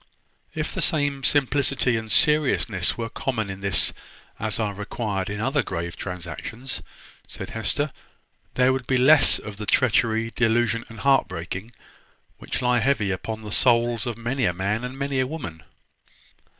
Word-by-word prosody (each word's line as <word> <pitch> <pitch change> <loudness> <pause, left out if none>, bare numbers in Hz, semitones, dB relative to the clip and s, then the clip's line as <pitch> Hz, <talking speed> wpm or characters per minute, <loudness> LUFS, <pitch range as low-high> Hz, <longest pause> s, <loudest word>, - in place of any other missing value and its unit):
"If - - -2
the - - -2
same 145 -4 +1
simplicity 135 -2 +2
and 110 -1 -4
seriousness 135 - +3
were 115 -1 -3
common 115 -4 -3
in 95 0 -8
this 100 -1 +3 0.5
as 110 0 -2
are 105 -2 -1
required 100 -1 -3
in 100 0 -4
other 135 +5 +1
grave 85 -5 -4
transactions," 100 +8 -6 0.5
said - - -7
Hester, 130 +7 -1 0.6
"there 130 +1 +4
would 130 -2 -4
be 130 - +2
less 140 +4 +6
of 105 -2 -9
the 105 0 -6
treachery, 115 -2 +2
delusion, 115 0 +1
and 115 - -10
heart 140 -1 +4
breaking, 95 +4 -6 0.7
which - - -4
lie 125 0 +3
heavy 115 -5 +1
upon 110 +4 -4
the 105 - -7
souls 120 0 +2
of 120 -2 -3
many 120 +2 -1
a 90 - +1
man 100 +6 -1
and 125 +2 -6
many 140 -1 -1
a 130 - +1
woman." 130 - -7
115 Hz, 160 wpm, -24 LUFS, 105-130 Hz, 0.7 s, less